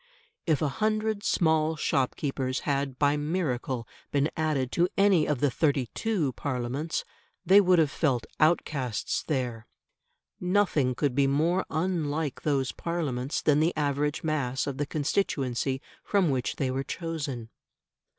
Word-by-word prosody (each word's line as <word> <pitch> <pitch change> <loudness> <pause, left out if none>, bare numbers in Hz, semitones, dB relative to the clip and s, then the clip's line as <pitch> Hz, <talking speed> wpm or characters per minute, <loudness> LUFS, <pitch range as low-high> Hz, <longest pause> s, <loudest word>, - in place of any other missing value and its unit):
If 155 -2 +2
a - - +3
hundred 215 -1 +1
small 160 -4 +2
shopkeepers 135 -2 -1
had 140 -2 -1
by 145 +1 +3
miracle 140 -6 -2 0.2
been 145 +1 +1
added 150 -5 0
to 175 +1 +2
any 195 -6 +4
of 145 -4 -1
the 145 -2 +3
'32 145 - 0
Parliaments, 135 +4 -3 0.4
they 195 +2 +7
would 185 -2 +4
have 155 -3 +3
felt 135 -7 0
outcasts 145 -7 +1
there. 125 -6 -3 0.7
Nothing 180 -9 +2
could 140 0 0
be 140 +1 +3
more 160 +7 +1
unlike 155 -4 -1
those 135 -3 0
Parliaments 145 -6 -2
than 150 -1 +4
the 160 +1 +1
average 145 0 0
mass 140 -5 -1
of 140 -2 -4
the 145 - -1
constituency 135 -5 -1 0.2
from 195 -7 +2
which 130 -2 -1
they 130 -2 -1
were 135 +1 -1
chosen. 140 -9 -4
145 Hz, 135 wpm, -28 LUFS, 130-165 Hz, 0.7 s, they